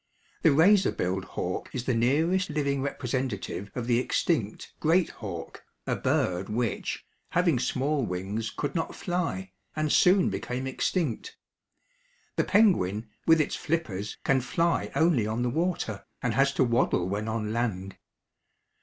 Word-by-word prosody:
The 160 Hz, -, +5 dB
razor 185 Hz, +7 st, +5 dB
billed 95 Hz, +1 st, -2 dB
hawk -, -, -4 dB
is 125 Hz, -, -3 dB
the 130 Hz, -, +1 dB
nearest 160 Hz, +11 st, +2 dB
living 140 Hz, -2 st, 0 dB
representative 125 Hz, -7 st, -3 dB
of 125 Hz, -2 st, -3 dB
the 120 Hz, 0 st, +3 dB
extinct 125 Hz, -, -1 dB
great 165 Hz, +3 st, +3 dB
hawk, 85 Hz, -7 st, -7 dB, 0.2 s
a -, -, 0 dB
bird 90 Hz, +2 st, 0 dB
which, 115 Hz, +2 st, -2 dB, 0.2 s
having 170 Hz, -7 st, +2 dB
small 140 Hz, +3 st, 0 dB
wings, 100 Hz, +3 st, -3 dB
could 145 Hz, -, -4 dB
not 165 Hz, -2 st, -2 dB
fly, 165 Hz, -, -2 dB, 0.2 s
and 155 Hz, -1 st, 0 dB
soon 185 Hz, -, +5 dB
became 125 Hz, +6 st, -3 dB
extinct. 160 Hz, -, -2 dB, 1.0 s
The -, -, +2 dB
penguin, 115 Hz, -, +3 dB, 0.2 s
with 165 Hz, 0 st, +6 dB
its 155 Hz, -, 0 dB
flippers, 110 Hz, -, -3 dB
can 135 Hz, -1 st, +3 dB
fly 165 Hz, +7 st, 0 dB
only 160 Hz, -10 st, +3 dB
on 110 Hz, +3 st, -1 dB
the 125 Hz, -, 0 dB
water, 160 Hz, -, -2 dB, 0.2 s
and 125 Hz, -3 st, +1 dB
has 135 Hz, +2 st, +3 dB
to -, -, +4 dB
waddle 120 Hz, -7 st, +2 dB
when 105 Hz, +3 st, -2 dB
on 110 Hz, -1 st, -2 dB
land. 95 Hz, -5 st, -2 dB
125 Hz, 145 wpm, -28 LUFS, 105-160 Hz, 1.0 s, with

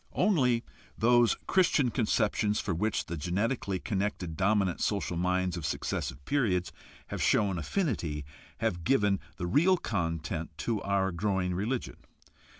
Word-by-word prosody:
Only 130 Hz, -, +2 dB, 0.3 s
those 120 Hz, +1 st, +4 dB
Christian 155 Hz, -9 st, +3 dB
conceptions 110 Hz, -2 st, +1 dB
for 95 Hz, -, -1 dB
which 105 Hz, +6 st, 0 dB
the 85 Hz, -, -4 dB
genetically 95 Hz, -, -1 dB
connected 95 Hz, -4 st, -2 dB
dominant 95 Hz, 0 st, +1 dB
social 100 Hz, -4 st, 0 dB
minds 90 Hz, +1 st, 0 dB
of 85 Hz, -, -5 dB
successive 70 Hz, -1 st, -3 dB
periods 100 Hz, -11 st, +1 dB, 0.4 s
have -, -, -4 dB
shown 95 Hz, -4 st, +2 dB
affinity 80 Hz, -, -2 dB, 0.4 s
have 95 Hz, -7 st, -1 dB
given 105 Hz, -3 st, +2 dB, 0.2 s
the 90 Hz, -, -3 dB
real 170 Hz, -, +4 dB
content 80 Hz, -, -3 dB
to 110 Hz, +2 st, -1 dB
our 100 Hz, -1 st, +1 dB
growing 95 Hz, 0 st, 0 dB
religion. 110 Hz, +8 st, -2 dB
100 Hz, 130 wpm, -30 LUFS, 90-115 Hz, 0.4 s, those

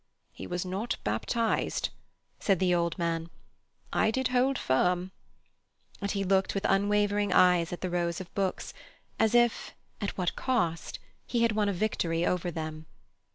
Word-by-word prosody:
"He -, -, -8 dB
was 175 Hz, +1 st, -3 dB
not 195 Hz, +6 st, -2 dB
baptized," 220 Hz, -, 0 dB, 0.5 s
said 195 Hz, -2 st, +2 dB
the 180 Hz, 0 st, +2 dB
old 170 Hz, -1 st, 0 dB
man. 165 Hz, -1 st, -1 dB, 0.6 s
"I 220 Hz, -, +3 dB
did 260 Hz, +3 st, 0 dB
hold 255 Hz, +2 st, +2 dB
firm." 180 Hz, +7 st, +1 dB, 0.9 s
And 200 Hz, -, -1 dB
he 200 Hz, 0 st, -1 dB
looked 190 Hz, +1 st, +1 dB
with 195 Hz, -, -1 dB
unwavering 205 Hz, 0 st, +2 dB
eyes 180 Hz, -2 st, +4 dB
at 175 Hz, -, -5 dB
the 185 Hz, -, -2 dB
rows 170 Hz, -1 st, -1 dB
of 185 Hz, -1 st, -9 dB
books, 195 Hz, -2 st, -2 dB, 0.5 s
as 220 Hz, +1 st, +3 dB
if—at 240 Hz, -3 st, 0 dB
what 180 Hz, -2 st, -1 dB
cost!—he 230 Hz, +1 st, -2 dB
had 230 Hz, -, +3 dB
won 210 Hz, -1 st, +1 dB
a -, -, +2 dB
victory 175 Hz, -4 st, 0 dB
over 180 Hz, -1 st, 0 dB
them. 155 Hz, -1 st, -6 dB
185 Hz, 150 wpm, -29 LUFS, 170-210 Hz, 0.9 s, eyes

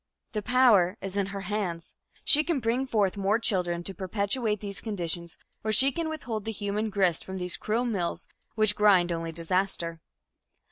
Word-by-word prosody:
The 215 Hz, -4 st, -2 dB
power 220 Hz, -6 st, +4 dB
is 195 Hz, 0 st, -6 dB
in 200 Hz, -1 st, 0 dB
her 200 Hz, 0 st, -5 dB
hands. 185 Hz, -4 st, -3 dB, 0.3 s
She 300 Hz, +1 st, +6 dB
can 320 Hz, -3 st, 0 dB
bring 245 Hz, +3 st, 0 dB
forth 205 Hz, -6 st, +1 dB
more 200 Hz, +2 st, +2 dB
children 180 Hz, -6 st, 0 dB
to 195 Hz, -, -5 dB
perpetuate 205 Hz, +4 st, -1 dB
these 200 Hz, -1 st, -5 dB
conditions, 170 Hz, -5 st, -3 dB, 0.3 s
or 215 Hz, -, 0 dB
she 265 Hz, +6 st, +6 dB
can 325 Hz, +3 st, -3 dB
withhold 245 Hz, -9 st, -4 dB
the 225 Hz, -, -2 dB
human 210 Hz, +1 st, -2 dB
grist 190 Hz, -5 st, +1 dB
from 190 Hz, 0 st, -7 dB
these 180 Hz, -3 st, 0 dB
cruel 225 Hz, +9 st, -1 dB
mills 195 Hz, -8 st, -2 dB, 0.3 s
which 215 Hz, -2 st, +3 dB
grind 190 Hz, -4 st, +4 dB
only 165 Hz, -1 st, -3 dB
disaster. 170 Hz, 0 st, -2 dB
200 Hz, 175 wpm, -27 LUFS, 180-220 Hz, 0.3 s, She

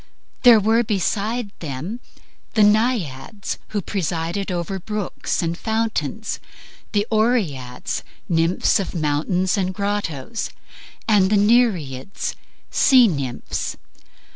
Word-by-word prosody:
There 240 Hz, -3 st, +8 dB
were 225 Hz, +3 st, +3 dB
beside 210 Hz, +2 st, -1 dB
them 160 Hz, -, -5 dB, 0.6 s
the 215 Hz, -, +5 dB
Naiads, 210 Hz, -, +1 dB
who 205 Hz, -3 st, -3 dB
presided 175 Hz, +1 st, -2 dB
over 180 Hz, +2 st, -2 dB
brooks 210 Hz, -2 st, -3 dB
and 165 Hz, 0 st, -1 dB
fountains, 220 Hz, -2 st, -2 dB, 0.5 s
the 205 Hz, 0 st, +1 dB
Oreads, 200 Hz, -, 0 dB, 0.3 s
nymphs 165 Hz, +1 st, +2 dB
of 190 Hz, -1 st, -4 dB
mountains 170 Hz, +5 st, +1 dB
and 185 Hz, -1 st, -1 dB
grottos, 205 Hz, -, -2 dB, 0.6 s
and 200 Hz, -4 st, +4 dB
the 210 Hz, -, +4 dB
Nereids, 200 Hz, -, +1 dB, 0.4 s
sea 255 Hz, -3 st, +6 dB
nymphs. 140 Hz, -, -3 dB
200 Hz, 100 wpm, -22 LUFS, 165-220 Hz, 0.6 s, There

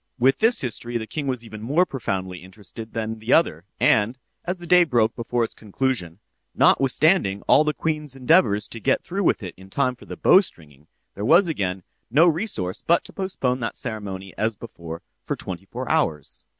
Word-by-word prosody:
With 130 Hz, +2 st, +3 dB
this 225 Hz, +2 st, +3 dB
history 120 Hz, -1 st, -3 dB
the 110 Hz, -, -5 dB
king 145 Hz, +5 st, -5 dB
was 125 Hz, -3 st, -2 dB
even 110 Hz, -2 st, -9 dB
more 145 Hz, +11 st, +2 dB
profoundly 95 Hz, -, -4 dB
interested 105 Hz, +4 st, -11 dB
than 110 Hz, -1 st, -2 dB
with 110 Hz, -, -7 dB
the 110 Hz, +3 st, 0 dB
other—and, 105 Hz, -, +2 dB, 0.3 s
as 180 Hz, +1 st, -2 dB
the 175 Hz, -, -7 dB
day 180 Hz, +1 st, +6 dB
broke 120 Hz, -8 st, +1 dB
before 120 Hz, 0 st, -1 dB
its 115 Hz, -, -3 dB
conclusion 105 Hz, -5 st, -3 dB, 0.4 s
(notwithstanding 135 Hz, -, +3 dB
all 150 Hz, -, +5 dB
the 150 Hz, -, +1 dB
queen's 150 Hz, -4 st, -2 dB
endeavors 130 Hz, -, +3 dB
to 115 Hz, -, -7 dB
get -, -, +1 dB
through 195 Hz, +3 st, -3 dB
with 120 Hz, -, +1 dB
it 90 Hz, -, -6 dB
in 95 Hz, +1 st, -14 dB
time 130 Hz, +4 st, 0 dB
for -, -, -16 dB
the -, -, -7 dB
bowstringing), 75 Hz, -, +2 dB, 0.3 s
there 100 Hz, -, -6 dB
was 170 Hz, -, +5 dB
again 95 Hz, -, -2 dB, 0.3 s
no 150 Hz, +8 st, +5 dB
resource 160 Hz, -, +1 dB
but 170 Hz, -, +2 dB
to -, -, -9 dB
postpone 135 Hz, -10 st, -2 dB
that 115 Hz, -2 st, -3 dB
ceremony 100 Hz, -5 st, -5 dB
as 110 Hz, 0 st, 0 dB
before, 85 Hz, -7 st, -9 dB, 0.2 s
for -, -, -3 dB
twenty -, -, -7 dB
four -, -, -6 dB
hours. 75 Hz, -3 st, -1 dB
115 Hz, 190 wpm, -23 LUFS, 100-150 Hz, 0.4 s, day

